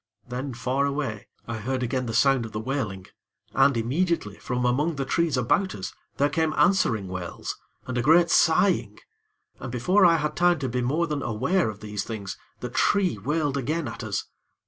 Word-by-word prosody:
Then, 125 Hz, +1 st, -4 dB
far 130 Hz, +3 st, 0 dB
away, 140 Hz, -7 st, -3 dB, 0.2 s
I 115 Hz, -1 st, -3 dB
heard 130 Hz, +4 st, -2 dB
again 125 Hz, +1 st, -1 dB
the 115 Hz, -, -3 dB
sound 135 Hz, 0 st, +4 dB
of 110 Hz, -, -8 dB
the 110 Hz, -, -2 dB
wailing 110 Hz, -7 st, -3 dB, 0.5 s
and, 140 Hz, -4 st, +4 dB
immediately, 130 Hz, -, -1 dB
from 125 Hz, 0 st, -2 dB
among 145 Hz, +7 st, +1 dB
the 135 Hz, -1 st, -2 dB
trees 165 Hz, 0 st, +1 dB
about 190 Hz, -, +1 dB
us, 95 Hz, -, -6 dB, 0.2 s
there 140 Hz, -, +3 dB
came 160 Hz, +1 st, 0 dB
answering 115 Hz, -, +3 dB
wails 90 Hz, -2 st, -5 dB, 0.3 s
and 130 Hz, -, -4 dB
a -, -, +2 dB
great 165 Hz, +5 st, +5 dB
sighing. 175 Hz, +4 st, +3 dB, 0.6 s
And 130 Hz, -, -6 dB
before 180 Hz, -, +3 dB
I 170 Hz, -2 st, +7 dB
had 150 Hz, -1 st, -2 dB
time 175 Hz, 0 st, +4 dB
to 135 Hz, -3 st, -3 dB
be 125 Hz, +1 st, -1 dB
more 150 Hz, +8 st, +1 dB
than 150 Hz, -3 st, -3 dB
aware 140 Hz, -, +1 dB
of 105 Hz, -1 st, -8 dB
these 105 Hz, -1 st, -4 dB
things, 105 Hz, -4 st, -5 dB, 0.3 s
the 125 Hz, -, -4 dB
tree 180 Hz, -, +2 dB
wailed 145 Hz, +4 st, -1 dB
again 150 Hz, +4 st, -1 dB
at 115 Hz, +2 st, -6 dB
us. 100 Hz, -3 st, -2 dB
130 Hz, 190 wpm, -25 LUFS, 115-160 Hz, 0.6 s, I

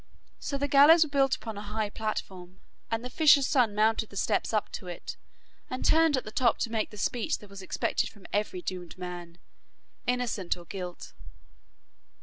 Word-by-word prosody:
So 280 Hz, -, -3 dB
the 285 Hz, +1 st, -1 dB
gallows 295 Hz, +4 st, +7 dB
was 305 Hz, -, -7 dB
built 270 Hz, -2 st, +3 dB
upon 220 Hz, -3 st, -7 dB
a -, -, -6 dB
high 210 Hz, 0 st, -3 dB
platform, 190 Hz, -4 st, -5 dB, 0.3 s
and 225 Hz, +2 st, -2 dB
the -, -, -4 dB
fisher's 290 Hz, -2 st, +6 dB
son 250 Hz, -8 st, +2 dB
mounted 220 Hz, +1 st, +2 dB
the -, -, -13 dB
steps 205 Hz, +1 st, 0 dB
up 215 Hz, -2 st, 0 dB
to 185 Hz, -, -7 dB
it, 175 Hz, -, -6 dB, 0.5 s
and 255 Hz, -, -4 dB
turned 320 Hz, -3 st, +4 dB
at 255 Hz, -, -2 dB
the 215 Hz, -, -8 dB
top 240 Hz, +1 st, +2 dB
to 230 Hz, -, -1 dB
make 220 Hz, -2 st, -1 dB
the 210 Hz, -, -12 dB
speech 245 Hz, +8 st, -1 dB
that 205 Hz, -1 st, -15 dB
was 200 Hz, -1 st, -9 dB
expected 185 Hz, -, -1 dB
from 205 Hz, -4 st, -18 dB
every 205 Hz, -3 st, -1 dB
doomed 180 Hz, -2 st, -6 dB
man, 175 Hz, -2 st, -7 dB, 0.7 s
innocent 240 Hz, -8 st, -1 dB
or 175 Hz, -, -12 dB
guilt. 180 Hz, -1 st, -7 dB
215 Hz, 185 wpm, -29 LUFS, 190-260 Hz, 0.7 s, gallows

